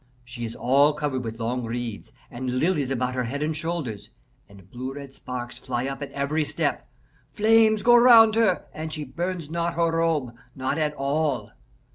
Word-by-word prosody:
She 120 -1 -6
is 115 - -7
all 140 +4 +4
covered 145 -4 -2
with 115 0 -6
long 120 +2 -2
reeds 115 -2 -5 0.2
and 125 +1 -3
lilies 150 -3 +1
about 125 -1 -1
her 125 -1 -1
head 140 +5 -3
and 155 +1 -1
shoulders, 150 -10 -4 0.4
and 100 -2 -16
blue 130 +5 -6
red 140 -2 -9
sparks 125 -2 -7
fly 125 -1 -3
up 135 +1 -5
at 145 - -5
every 145 +3 -1
step. - - -2 0.4
Flames 220 0 +4
go 240 0 +7
round 235 -2 +8
her, 220 -5 +2
and 155 0 -5
she 155 -1 -4
burns 170 +3 -4
not 170 0 -1
her 165 0 +2
robe 160 -7 0 0.2
not 135 +3 -2
at 150 -1 0
all. 140 -5 -1
140 Hz, 180 wpm, -25 LUFS, 125-165 Hz, 0.4 s, round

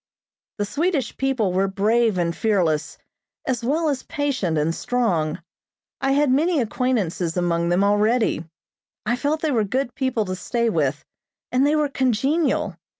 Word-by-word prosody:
The 205 - -1
Swedish 290 - -1
people 255 -8 0
were 190 +2 +2
brave 215 +2 +2
and 170 -1 0
fearless, 175 -9 0 0.5
as 245 -3 -1
well 310 +7 +1
as 275 -4 0
patient 255 - -1
and 155 +2 +1
strong. 170 -9 -1 0.6
I 270 0 +2
had 285 -1 +3
many 315 +4 +2
acquaintances 210 -8 -1
among 170 -1 +1
them 180 +3 +3
already. 210 -2 +2 0.6
I 240 +3 +1
felt 290 +5 -1
they 315 - 0
were 230 -5 +2
good 245 +4 -2
people 260 -5 -1
to 185 -1 -3
stay 235 +4 -1
with, 145 -5 -1 0.5
and 260 +3 +3
they 300 - +2
were 300 -1 +2
congenial. 270 +4 0
230 Hz, 150 wpm, -23 LUFS, 185-270 Hz, 0.6 s, had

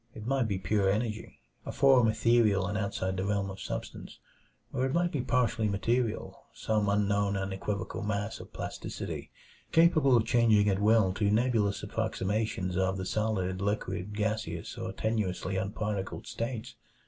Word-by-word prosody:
It 110 - -8
might 130 -1 +1
be 100 -3 -1
pure 95 +1 +1
energy 110 +2 -2 0.2
a - - -5
form 135 -4 +5
ethereal 110 -3 +3
and 100 +2 -3
outside 100 -2 -2
the 95 - -1
realm 100 -1 -1
of 95 - -9
substance - - -6 0.6
or 125 - 0
it 130 - -3
might 175 0 +2
be 145 - -1
partly 115 -3 +1
material; 115 +3 -1
some 105 -2 0
unknown 100 0 +1
and 95 0 -3
equivocal 100 0 -3
mass 105 +1 -2
of - - -11
plasticity, - - -6 0.4
capable 155 -6 +5
of 110 - +1
changing 115 -4 +4
at 95 0 0
will 105 -3 +4
to 100 0 +1
nebulous 110 -2 +1
approximations 95 -2 -2
of 95 0 +1
the 95 - -4
solid, 95 -3 -1
liquid, 100 -1 -2
gaseous, 105 -6 -2
or - - -4
tenuously 105 -4 -2
unparticled 100 0 -3
states. 115 -1 -4
105 Hz, 155 wpm, -30 LUFS, 100-115 Hz, 0.6 s, form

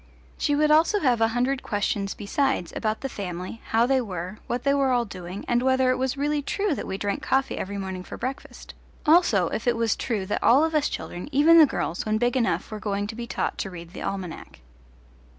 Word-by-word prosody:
She 290 - 0
would 300 +1 +3
also 325 +7 +4
have 245 -5 +2
a 225 - +5
hundred 250 +4 0
questions 205 -1 -2
besides 220 - -1
about 215 0 -2
the 270 - -2
family, 185 -1 -6
how 225 +1 +2
they 265 +1 +2
were, 185 -2 -6
what 245 0 -2
they 280 - +3
were 275 -1 +2
all 245 -2 +2
doing, 185 -1 -8
and 240 0 +2
whether 260 0 +3
it 255 - 0
was 260 +1 -1
really 295 +1 0
true 400 +5 -1
that - - -5
we 190 - -3
drank 200 0 -2
coffee 270 0 0
every 200 +1 -4
morning 190 -2 -5
for - - -8
breakfast; 260 +3 -6 0.3
also 300 - +4
if 225 - -4
it 240 -1 +3
was 230 -2 +1
true 215 -6 -2
that 205 - -2
all 270 +6 +5
of 320 0 0
us 300 -2 +2
children, 175 +9 -6
even 315 +4 +6
the 310 - +8
girls, 175 - -2
when 215 0 0
big 245 +2 +1
enough 245 -3 0
were 215 - -5
going 205 -1 -2
to 215 +2 -6
be 235 0 -6
taught - - -2
to 195 - -2
read 170 -1 -10
the - - -8
almanac. 185 - -6
235 Hz, 225 wpm, -25 LUFS, 200-270 Hz, 0.3 s, the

